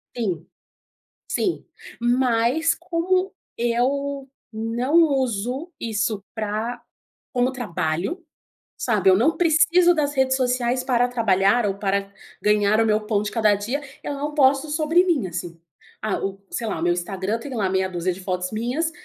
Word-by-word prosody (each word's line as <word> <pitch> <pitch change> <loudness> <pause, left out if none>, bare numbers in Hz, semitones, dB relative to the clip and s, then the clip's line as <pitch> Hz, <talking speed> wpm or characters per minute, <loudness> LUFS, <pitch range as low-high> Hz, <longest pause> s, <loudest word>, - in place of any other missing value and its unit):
Sim, 185 -9 -3 0.8
sim, 360 - -1 0.3
mas 245 +6 +2
como 365 +3 0 0.2
eu 270 +4 0 0.2
não 230 +5 -2
uso 265 - -1
isso 215 -2 -1
pra 220 +2 -3 0.5
como 250 0 +2
trabalho, 190 - -3 0.5
sabe 210 -5 +2
eu 185 - +6
não 290 +10 +2
preciso 345 +1 +4
das 290 -3 0
redes 265 -1 +2
sociais 250 0 0
para 245 -2 +2
trabalhar 225 -1 +2
ou 195 -1 0
para 200 0 -1 0.3
ganhar 210 0 +3
o 225 - +4
meu 215 0 +2
pão 210 -2 +1
de 210 - -3
cada 215 -3 +3
dia, 235 +9 -3 0.2
eu - - -3
não 290 +1 -4
posto 275 0 +3
sobre 315 +3 +3
mim 300 - +1
assim, 170 -1 -6 0.4
ah 215 -2 -1
o, 195 0 -3
sei 230 - -3
lá, 200 - -2
o - - -3
meu 175 0 +3
Instagram 190 +4 -3
tem 265 +3 -7
lá 205 -6 0
meia 190 0 0
dúzia 180 0 -1
de 190 - -11
fotos 180 -1 -2
minhas, 245 +9 -1
235 Hz, 155 wpm, -23 LUFS, 200-280 Hz, 0.8 s, eu